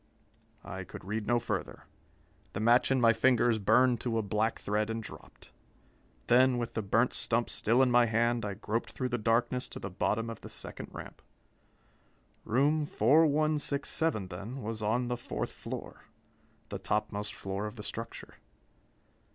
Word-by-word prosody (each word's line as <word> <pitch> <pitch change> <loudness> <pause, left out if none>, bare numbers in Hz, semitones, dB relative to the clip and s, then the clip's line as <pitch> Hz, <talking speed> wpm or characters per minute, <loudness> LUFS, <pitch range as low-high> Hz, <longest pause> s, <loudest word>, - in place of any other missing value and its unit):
I - - -6
could - - -10
read 105 +1 -3
no 120 - +3
further. 120 - -3 0.7
The - - -3
match 120 +3 +4
in 135 -1 +3
my 115 -1 +5
fingers 120 -1 +3
burned 125 +3 +4
to 115 -2 -1
a 110 - +1
black 105 +3 0
thread 105 +2 -1
and 115 0 -3
dropped. - - -13 0.7
Then, 125 +1 +5
with 120 -1 -3
the 110 - -1
burnt 115 +4 +2
stump 115 0 +1
still 120 +5 +3
in 125 - +2
my 120 -1 +5
hand, 115 +1 +1
I 100 -1 -3
groped 110 +5 -2
through 130 -1 -3
the 120 -1 -1
darkness 120 +3 +1
to - - -8
the 95 - -6
bottom 110 +5 0
of 115 - -9
the - - -9
second - - -8
ramp. - - -9 1.2
Room 145 +6 +2
4167, 150 - +2
then, 105 +9 -7
was 110 0 -3
on 120 +4 +1
the 125 0 -2
fourth 120 - -4
floor - - -8 0.6
the - - -5
topmost 105 -1 -2
floor 100 +2 -4
of 105 - -8
the 105 - -8
structure. 115 +1 -7
115 Hz, 160 wpm, -31 LUFS, 105-125 Hz, 1.2 s, my